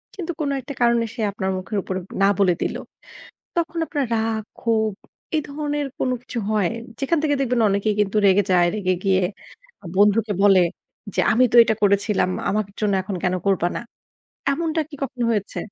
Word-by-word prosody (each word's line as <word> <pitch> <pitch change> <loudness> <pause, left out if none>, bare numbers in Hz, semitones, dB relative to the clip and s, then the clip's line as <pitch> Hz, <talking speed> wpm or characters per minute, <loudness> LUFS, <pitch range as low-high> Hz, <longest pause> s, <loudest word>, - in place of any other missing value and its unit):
কিন্তু 360 -3 -4
কোন 285 - 0
একটা 280 +3 -7
কারণে 235 -1 +3
সে 235 - -5
আপনার 190 -1 -2
মুখের 205 +3 -4
উপর 185 - -4 0.3
না - - +6
বলে 185 -3 +4
দিল। - - -1 0.8
তখন 335 0 -1
আপনার 285 -4 -1
রাগ, 220 0 0 0.2
ক্ষোভ 220 -2 +1 0.4
এই 310 - +2
ধরনের 295 0 -2
কোনো 255 - +1
কিছু 250 -1 -5
হয়? 210 -5 +2 0.3
যেখান 285 +4 +1
থেকে 290 -2 +2
দেখবেন 250 -3 +1
অনেকেই 200 +2 +1
কিন্তু 210 0 +1
রেগে 200 +1 +5
যায়। 175 -1 +5
রেগে 185 -3 0
গিয়ে 190 -1 +3 0.7
বন্ধুকে 210 +1 +3
বলে, 195 -2 +6 0.6
"যে - - 0
আমি 245 +3 +4
তো - - +1
এটা 225 -1 0
করেছিলাম, 200 -1 +2 0.2
আমার 215 -1 0
জন্য 210 -2 +1
এখন 190 0 -5
কেন 185 -1 +1
করবা 185 -3 +2
না?" - - -3 0.7
এমনটা 320 +2 -1
কি 310 - -11
কখন 260 -2 -5
হয়েছে? 210 -3 -2
220 Hz, 175 wpm, -22 LUFS, 195-270 Hz, 0.8 s, না